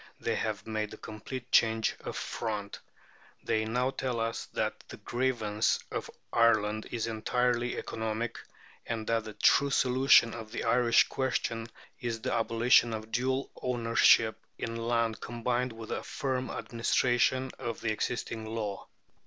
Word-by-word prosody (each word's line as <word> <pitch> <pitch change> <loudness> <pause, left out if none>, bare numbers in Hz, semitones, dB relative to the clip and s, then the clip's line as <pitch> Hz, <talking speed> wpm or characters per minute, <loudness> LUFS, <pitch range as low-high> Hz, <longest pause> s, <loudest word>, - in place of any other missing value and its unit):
They - - -1
have 110 -2 -2
made 110 -1 -2
a - - -17
complete 120 +4 -8
change 110 -1 +3
of - - -5
front. 105 -3 -4 0.6
They 110 0 0
now 125 +4 0
tell 130 -3 -2
us 115 0 -2
that - - -2
the - - -8
grievance 120 -4 0
of - - -4 0.2
Ireland 110 -2 +3
is 115 -2 -2
entirely 120 +2 0
economic, 110 +1 -3 0.5
and 115 -1 -3
that 115 -1 0
the 110 - -7
true 140 - +4
solution 130 -3 +5
of 110 -2 -8
the - - -3
Irish 120 0 +4
question 115 -3 -1 0.3
is 115 -2 -3
the - - -2
abolition 115 +1 +4
of 110 +1 -8
dual 130 +3 0
ownership 115 -2 +4 0.2
in 115 - -4
land 115 -1 0
combined 120 +1 -1
with 115 -1 -9
a - - -2
firm 130 -2 -2
administration 125 +2 +1
of 115 -2 -4
the 115 - 0
existing 110 0 -3
law. 110 -3 -4
115 Hz, 145 wpm, -30 LUFS, 110-125 Hz, 0.6 s, solution